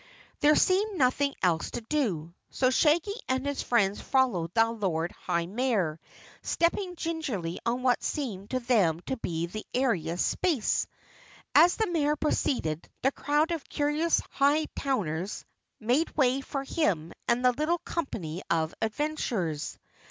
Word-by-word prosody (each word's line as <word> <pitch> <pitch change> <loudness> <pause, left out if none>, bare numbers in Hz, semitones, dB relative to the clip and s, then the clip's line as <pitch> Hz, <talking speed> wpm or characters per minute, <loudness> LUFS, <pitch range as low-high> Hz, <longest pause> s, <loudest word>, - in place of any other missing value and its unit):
There 300 +1 +5
seemed 395 +2 +2
nothing 275 +1 +2
else 170 -3 +2
to - - -5
do, 215 - -1 0.2
so 255 -1 +1
Shaggy 320 +8 +3 0.2
and 260 +1 0
his 285 -1 -1
friends 205 -4 +1
followed 205 -11 +1
the 225 0 +4
Lord 175 -7 -1
High 170 0 -2
Mayor, 195 -6 0 0.4
stepping 355 +2 0
gingerly 280 - -3
on 245 +2 0
what 250 -1 +3
seemed 210 -10 -3
to 255 - 0
them 200 -10 +2
to 265 - -4
be 170 -6 -2
the 215 +5 -6
airiest 185 -10 +1
space. 320 - +1 0.7
As 355 +1 +7
the 440 - +1
Mayor 305 -6 +1
proceeded, 205 - -1
the 270 - +4
crowd 295 +4 +1
of 330 -3 -4
curious 300 +3 +1 0.2
Hightowners 265 - 0 0.3
made 250 +9 +1
way 265 -1 +3
for 275 0 -4
him 180 - 0
and 240 +1 +2
the 250 - +7
little 305 +7 0
company 195 - -4
of 160 -1 +1
adventurers. 220 - -2
255 Hz, 140 wpm, -28 LUFS, 185-300 Hz, 0.7 s, As